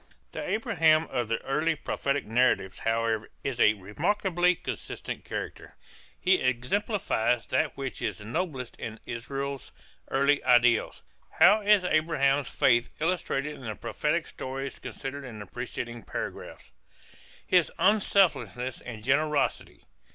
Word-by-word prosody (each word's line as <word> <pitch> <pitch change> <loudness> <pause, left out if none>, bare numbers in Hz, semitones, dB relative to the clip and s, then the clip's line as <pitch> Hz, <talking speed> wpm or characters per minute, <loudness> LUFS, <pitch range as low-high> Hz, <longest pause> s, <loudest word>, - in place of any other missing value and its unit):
The - - -5
Abraham 190 - +3
of 120 -2 -1
the 115 - 0
early 155 +4 +1
prophetic 140 -1 -2
narratives, 115 -4 +1
however, 115 -1 0
is 130 -3 -3
a 105 - +6
remarkably 175 - +1
consistent - - -6
character. - - -6 0.4
He 185 0 +4
exemplifies 130 - 0
that 145 +4 0
which 135 -2 -5
is - - -2
noblest 130 - -4
in 110 0 -6
Israel's 135 +3 -5 0.4
early 140 +2 +2
ideals. 120 -2 +3 0.3
How 215 +1 +6
is 205 -2 +5
Abraham's 145 -5 +2
faith 120 -1 +3
illustrated 150 -3 -1
in 145 - -12
the 110 -1 -4
prophetic 155 +8 -1
stories 135 +1 -6
considered 140 +1 -6
in 120 -5 -8
the 105 - -7
preceding 120 +1 -6
paragraph? 65 - -7 0.7
His 180 -5 +3
unselfishness 190 - +2
and 115 -3 -8
generosity? 145 +2 0
135 Hz, 120 wpm, -28 LUFS, 120-165 Hz, 0.7 s, a